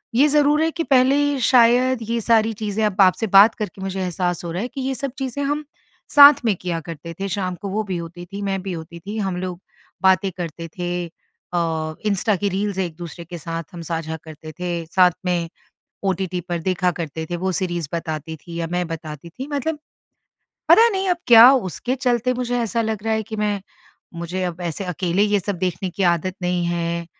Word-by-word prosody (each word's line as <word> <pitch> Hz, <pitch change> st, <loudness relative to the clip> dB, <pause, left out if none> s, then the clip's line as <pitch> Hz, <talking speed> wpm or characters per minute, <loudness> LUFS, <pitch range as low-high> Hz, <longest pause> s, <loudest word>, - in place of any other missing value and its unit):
ये 275 Hz, +5 st, +6 dB
ज़रूर 295 Hz, +1 st, +3 dB
है 325 Hz, -, +2 dB
कि 335 Hz, +1 st, -2 dB
पहले 280 Hz, +1 st, +3 dB
शायद 245 Hz, +1 st, +4 dB
ये 235 Hz, 0 st, 0 dB
सारी 225 Hz, 0 st, +3 dB
चीज़ें 215 Hz, 0 st, -2 dB
अब 205 Hz, -1 st, +1 dB
आपसे 195 Hz, +4 st, +4 dB
बात 200 Hz, +3 st, +7 dB
करके 205 Hz, -3 st, -6 dB
मुझे 190 Hz, 0 st, -3 dB
एहसास 180 Hz, -1 st, -2 dB
हो 170 Hz, -, -4 dB
रहा 175 Hz, +3 st, -3 dB
है 240 Hz, -, -2 dB
कि 270 Hz, -, -7 dB
ये 265 Hz, +1 st, -1 dB
सब 275 Hz, +2 st, -4 dB
चीज़ें 270 Hz, +1 st, -3 dB
हम 295 Hz, +2 st, -1 dB, 0.5 s
साथ 285 Hz, 0 st, +11 dB
में 215 Hz, -3 st, +3 dB
किया 175 Hz, -2 st, -3 dB
करते 165 Hz, +1 st, -8 dB
थे। 195 Hz, -, -2 dB
शाम 185 Hz, -1 st, -2 dB
को 200 Hz, -, -4 dB
वो 215 Hz, +3 st, -1 dB
भी 190 Hz, -4 st, -3 dB
होती 170 Hz, +1 st, -8 dB
थी, 200 Hz, +3 st, -7 dB
मैं 195 Hz, -1 st, -2 dB
भी 190 Hz, 0 st, -5 dB
होती 170 Hz, +1 st, -8 dB
थी, 205 Hz, +5 st, -6 dB
हम 190 Hz, -4 st, -2 dB
लोग 180 Hz, -1 st, -4 dB, 0.4 s
बातें 190 Hz, 0 st, +4 dB
करते 165 Hz, -1 st, -5 dB
थे। 175 Hz, 0 st, -2 dB
अ, 165 Hz, -1 st, -4 dB
इंस्टा 210 Hz, +1 st, +1 dB
की 200 Hz, +2 st, -1 dB
रील्स 200 Hz, +1 st, -2 dB
एक-दूसरे 170 Hz, -1 st, -5 dB
के 175 Hz, +1 st, -8 dB
साथ 165 Hz, +1 st, -5 dB
हम 170 Hz, -, -7 dB
साझा 160 Hz, -1 st, -3 dB
करते 155 Hz, 0 st, -10 dB
थे, 175 Hz, -2 st, -3 dB
साथ 180 Hz, +2 st, +4 dB
में 175 Hz, -2 st, 0 dB, 0.5 s
ओटीटी 185 Hz, -2 st, -1 dB
पर 175 Hz, -1 st, -1 dB
देखा 180 Hz, +1 st, +1 dB
करते 160 Hz, 0 st, -4 dB
थे, 175 Hz, -, -2 dB
वो 190 Hz, +2 st, -1 dB
सीरीज़ 175 Hz, -4 st, -2 dB
बताती 160 Hz, -1 st, -4 dB
थी 170 Hz, +3 st, -11 dB
या 165 Hz, -, -2 dB
मैं 180 Hz, 0 st, 0 dB
बताती 160 Hz, -1 st, -7 dB
थी 260 Hz, +11 st, -7 dB
मतलब 295 Hz, +2 st, -2 dB, 0.9 s
पता 460 Hz, +1 st, +8 dB
नहीं 385 Hz, -3 st, -1 dB
अब 360 Hz, -, +2 dB
क्या 235 Hz, +1 st, +10 dB
उसके 245 Hz, +1 st, -2 dB
चलते 250 Hz, -1 st, +1 dB
मुझे 245 Hz, 0 st, -1 dB
ऐसा 230 Hz, 0 st, 0 dB
लग 220 Hz, -2 st, -3 dB
रहा 225 Hz, -, +1 dB
है 220 Hz, -, -1 dB
कि 220 Hz, +1 st, -7 dB
मैं 210 Hz, -1 st, -1 dB, 0.5 s
मुझे 170 Hz, +2 st, -4 dB
अब 175 Hz, 0 st, -4 dB
ऐसे 170 Hz, +3 st, -3 dB
अकेले 180 Hz, +1 st, 0 dB
ये 205 Hz, -1 st, +2 dB
सब 200 Hz, +1 st, -3 dB
देखने 185 Hz, +1 st, -2 dB
की 195 Hz, -, -4 dB
आदत 175 Hz, +2 st, -2 dB
नहीं 180 Hz, 0 st, 0 dB
है 170 Hz, 0 st, -2 dB
185 Hz, 205 wpm, -21 LUFS, 170-225 Hz, 0.9 s, साथ